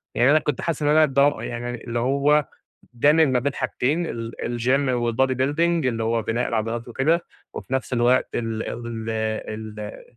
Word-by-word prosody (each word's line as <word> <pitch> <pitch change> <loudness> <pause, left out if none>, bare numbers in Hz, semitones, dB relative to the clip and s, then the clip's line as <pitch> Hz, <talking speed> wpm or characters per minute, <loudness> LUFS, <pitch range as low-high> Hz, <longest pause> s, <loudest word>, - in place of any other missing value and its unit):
يعني 125 +4 +4
أنا 155 - +5
كنت 150 -1 -2
حاسن 155 -3 -1
إن - - +4
هو 155 - +4
أنا 155 -3 +4
ضام 140 +2 +3
يعني 120 0 -5
اللي 120 -1 -3
هو 140 +4 +2 0.5
دامج 150 +6 +4
ما 130 -2 +2
بين 140 +2 -1
حاجتين 140 +6 -1
ال 115 -6 -5
الgym 130 +3 +1 0.2
والbody 130 +2 +2
building 160 +5 +1
اللي 115 -2 -1
هو 115 0 +1
بناء 115 +3 -1
العضلات 115 +1 -2
وكده 155 +8 +1 0.3
وفي 130 - -6
نفس 130 0 -2
الوقت 125 +1 +3
ال 115 -1 -2 0.5
ال 110 -1 -4
125 Hz, 170 wpm, -23 LUFS, 115-145 Hz, 0.5 s, أنا